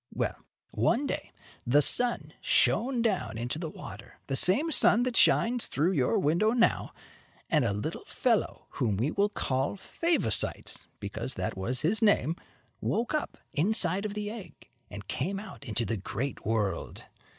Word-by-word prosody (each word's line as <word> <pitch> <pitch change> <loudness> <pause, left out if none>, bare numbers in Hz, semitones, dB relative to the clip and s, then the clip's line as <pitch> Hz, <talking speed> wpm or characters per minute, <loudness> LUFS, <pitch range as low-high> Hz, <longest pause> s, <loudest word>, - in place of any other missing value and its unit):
Well, - - -1 0.4
one - - +1
day, - - -4 0.3
the 145 +5 +4
sun 245 - +2
shone 240 +1 +2
down 195 - -1
into 120 +7 -3
the 165 -2 -4
water - - -11
the 135 - -2
same 225 - +3
sun 240 -5 +6
that 250 -1 -2
shines 240 +1 +4
through 160 +6 +1
your 135 -9 +1
window 175 +10 +2
now 235 -2 +2 0.6
and 150 -4 +3
a 115 - +1
little 105 +1 -4
fellow - - -1
whom 105 -5 -1
we 125 +9 0
will 200 +1 +1
call 135 -4 -1
Favosites, 315 - -1
because - - -4
that - - -3
was 120 +7 -3
his 200 +9 +1
name, 205 -6 +3 0.5
woke 230 +6 -1
up 305 - -2 0.2
inside 190 +3 +2
of 205 - -8
the 210 0 -3
egg 220 -4 -11 0.2
and - - -9
came 195 +1 -2
out 210 - -10
into 115 -2 -2
the 115 - -2
great 125 +8 -4
world. 105 -6 -2
175 Hz, 160 wpm, -29 LUFS, -, 0.6 s, sun